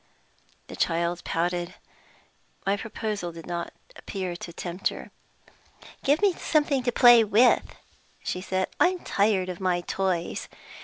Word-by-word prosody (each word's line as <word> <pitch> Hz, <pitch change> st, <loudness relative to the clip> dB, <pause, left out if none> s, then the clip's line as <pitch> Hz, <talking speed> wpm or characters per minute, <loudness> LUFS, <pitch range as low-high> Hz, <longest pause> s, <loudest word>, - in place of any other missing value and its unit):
The -, -, -9 dB
child 170 Hz, +1 st, 0 dB
pouted: 175 Hz, +1 st, -2 dB, 0.9 s
my 195 Hz, +1 st, +2 dB
proposal 210 Hz, -4 st, -4 dB
did 165 Hz, -1 st, -11 dB
not 170 Hz, -1 st, -4 dB, 0.2 s
appear 185 Hz, -3 st, -5 dB
to 175 Hz, -, -8 dB
tempt 175 Hz, +2 st, -3 dB
her. -, -, -6 dB, 0.9 s
"Give 290 Hz, +8 st, +2 dB
me 400 Hz, -3 st, +5 dB
something 295 Hz, -5 st, +1 dB
to 245 Hz, 0 st, 0 dB
play 240 Hz, -1 st, +7 dB
with," 220 Hz, +4 st, +3 dB, 0.5 s
she 180 Hz, -, -3 dB
said. 185 Hz, 0 st, -1 dB
"I'm 360 Hz, 0 st, +2 dB
tired 200 Hz, -2 st, +1 dB
of 180 Hz, -1 st, -5 dB
my 180 Hz, -2 st, 0 dB
toys. 180 Hz, -2 st, -2 dB
190 Hz, 135 wpm, -26 LUFS, 175-230 Hz, 0.9 s, play